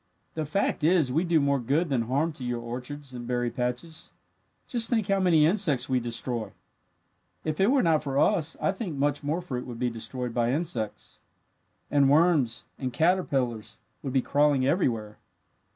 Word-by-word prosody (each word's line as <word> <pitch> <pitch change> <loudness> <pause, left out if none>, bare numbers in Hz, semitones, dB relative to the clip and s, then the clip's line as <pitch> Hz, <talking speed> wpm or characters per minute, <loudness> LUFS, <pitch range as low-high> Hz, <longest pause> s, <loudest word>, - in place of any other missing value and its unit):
The 155 -1 -3
fact 180 0 -1
is, 160 -6 +3
we 160 +5 +2
do 170 -3 +3
more 140 -1 +2
good 145 +8 0
than 130 -4 +1
harm 140 +8 0
to 135 - -9
your 120 -1 -2
orchards 130 +4 -7
and 120 -1 -7
berry 120 -1 -1
patches. 125 +7 -4 0.6
Just 235 -3 +2
think 225 -5 +1
how 195 0 +3
many 170 -5 +4
insects 155 -8 +2
we 130 -1 +2
destroy! 115 -1 -3 0.9
If 155 -1 -3
it 195 - +4
were 270 0 +3
not 160 -3 +3
for 140 -2 -3
us 165 -1 +2
I - - +1
think 190 -7 -5
much 145 +1 0
more 155 +5 -1
fruit 130 -8 -5
would 120 -2 -7
be 125 0 -1
destroyed 115 +2 -4
by 120 +1 +1
insects. 140 -9 -4 0.7
And 140 -2 +4
worms 145 -6 +3
and 130 -2 -3
caterpillars 135 - 0 0.2
would 135 -3 -5
be 130 -2 +2
crawling 145 -2 +2
everywhere. 115 - 0
140 Hz, 175 wpm, -27 LUFS, 125-165 Hz, 0.9 s, many